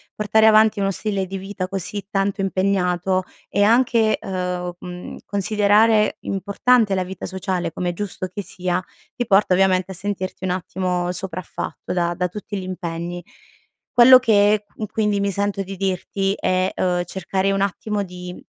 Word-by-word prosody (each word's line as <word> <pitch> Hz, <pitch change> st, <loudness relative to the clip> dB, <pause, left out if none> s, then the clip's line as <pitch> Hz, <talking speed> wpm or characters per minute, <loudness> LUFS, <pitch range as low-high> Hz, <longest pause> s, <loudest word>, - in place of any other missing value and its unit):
portare 215 Hz, +1 st, +3 dB
avanti 215 Hz, -1 st, +5 dB
uno 195 Hz, 0 st, +1 dB
stile 200 Hz, -1 st, -2 dB
di 195 Hz, +1 st, -5 dB
vita 190 Hz, -1 st, -5 dB
così 195 Hz, +1 st, -4 dB
tanto 195 Hz, 0 st, 0 dB
impegnato 185 Hz, -1 st, +1 dB, 0.3 s
e 200 Hz, -, 0 dB
anche, 230 Hz, 0 st, +3 dB
uhm, 180 Hz, -1 st, -3 dB
mhmm, 180 Hz, 0 st, -8 dB
considerare 210 Hz, +2 st, +3 dB
importante 200 Hz, +2 st, +2 dB
la 185 Hz, -, 0 dB
vita 185 Hz, +1 st, -7 dB
sociale 185 Hz, -2 st, -2 dB
com' 180 Hz, -, -4 dB
è 175 Hz, -, 0 dB
giusto 195 Hz, 0 st, -4 dB
che 185 Hz, +3 st, -6 dB
sia, 180 Hz, 0 st, -2 dB, 0.3 s
ti 245 Hz, -, -2 dB
porta 195 Hz, -1 st, +4 dB
ovviamente 185 Hz, 0 st, +2 dB
a -, -, -5 dB
sentirti 190 Hz, 0 st, -4 dB
un -, -, -1 dB
attimo 180 Hz, 0 st, -2 dB
sopraffatto 185 Hz, -1 st, -5 dB
da 175 Hz, -1 st, 0 dB
da 180 Hz, +1 st, 0 dB
tutti 205 Hz, +2 st, -6 dB
gli 190 Hz, -, -5 dB
impegni. 175 Hz, -1 st, -5 dB, 0.7 s
Quello 255 Hz, +1 st, +9 dB
che 210 Hz, -3 st, +3 dB
qu 215 Hz, -, -4 dB
quindi 210 Hz, -1 st, 0 dB
mi 200 Hz, 0 st, 0 dB
sento 200 Hz, 0 st, -1 dB
di 195 Hz, +1 st, -7 dB
dirti 195 Hz, +1 st, -1 dB
è, 185 Hz, +1 st, +1 dB
uhm, 180 Hz, -1 st, 0 dB
cercare 190 Hz, +2 st, -1 dB
un 195 Hz, 0 st, 0 dB
attimo 205 Hz, +1 st, -1 dB
di 180 Hz, -1 st, -8 dB
195 Hz, 160 wpm, -21 LUFS, 180-205 Hz, 0.7 s, Quello